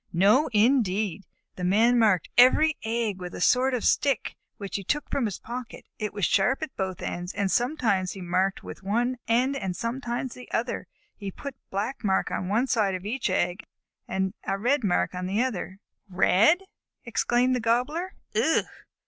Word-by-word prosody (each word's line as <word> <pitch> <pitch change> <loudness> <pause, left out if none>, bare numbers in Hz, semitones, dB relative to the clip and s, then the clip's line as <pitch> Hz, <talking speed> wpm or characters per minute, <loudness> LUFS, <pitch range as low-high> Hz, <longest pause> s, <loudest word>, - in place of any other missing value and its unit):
"No 205 - +4
indeed! 210 -5 +2 0.3
The 180 - -5
Man 225 +7 +4
marked 205 -7 +3
every 295 +6 +6
egg 220 -3 -1
with 180 -1 -7
a - - -6
sort 255 +7 +3
of 240 - -3
stick, 275 -5 +1 0.2
which 200 -2 -6
he 200 - -6
took 295 +9 -1
from 265 - +1
his 205 -4 -3
pocket. 240 0 -8
It 210 -1 -2
was 205 -3 -1
sharp 250 +10 +2
at 310 - -6
both 190 -2 -3
ends, 175 +1 -4
and 200 -2 0
sometimes 235 -8 +1
he 195 - -9
marked 185 +2 0
with - - -9
one 240 +6 0
end 250 +4 +2
and 190 -9 -3
sometimes 240 +2 -3
with 250 - -12
the - - 0
other. 240 +2 -3 0.3
He 200 -2 -6
put 280 +8 -7
a 255 - -51
black 215 +7 -3
mark 190 -2 +1
on 180 - -2
one 220 +6 +2
side 210 -7 +1
of 185 +1 -7
each 235 +1 -1
egg 180 +2 0 0.5
and 190 0 -1
a 195 - -1
red 250 +6 +1
mark 185 -2 +1
on 180 0 -4
the 205 +6 +1
other." 195 -6 -4 0.3
"Red!" 205 - +4 0.4
exclaimed 240 +2 +1
the - - 0
Gobbler. 255 +11 0 0.2
"Ugh!" - - +2
220 Hz, 185 wpm, -26 LUFS, 190-250 Hz, 0.5 s, every